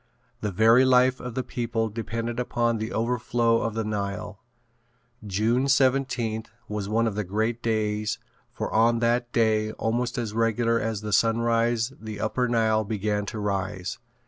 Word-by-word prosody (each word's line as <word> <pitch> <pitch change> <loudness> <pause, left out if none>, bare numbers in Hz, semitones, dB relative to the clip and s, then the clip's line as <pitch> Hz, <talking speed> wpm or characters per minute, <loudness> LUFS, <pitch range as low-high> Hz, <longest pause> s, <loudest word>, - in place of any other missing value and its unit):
The 105 - -2
very 115 +6 +5
life 130 0 +4
of 125 -1 -7
the 130 - -1
people 115 -2 -2
depended 115 +2 -4
upon 120 -2 0
the 110 +2 -3
overflow 115 0 +1
of 115 -1 -2
the 115 - -1
Nile. 100 -1 -4 0.9
June 110 +7 +1
17th 130 -5 +1 0.2
was 105 -1 -4
one 115 +2 +2
of 110 - 0
the 105 +1 -2
great 110 +5 -1
days 105 -2 -1 0.3
for - - -4
on 115 +1 +4
that 120 +1 +1
day 110 -2 +2
almost 120 +2 -1
as 115 -4 -3
regular 115 +1 +1
as 110 -2 -2
the 105 -1 -4
sunrise 115 +2 +2
the 110 -2 -7
upper 125 +4 0
Nile 110 -2 +2
began 105 -1 -2
to 110 - -5
rise. 100 -2 -3
115 Hz, 155 wpm, -26 LUFS, 110-120 Hz, 0.9 s, very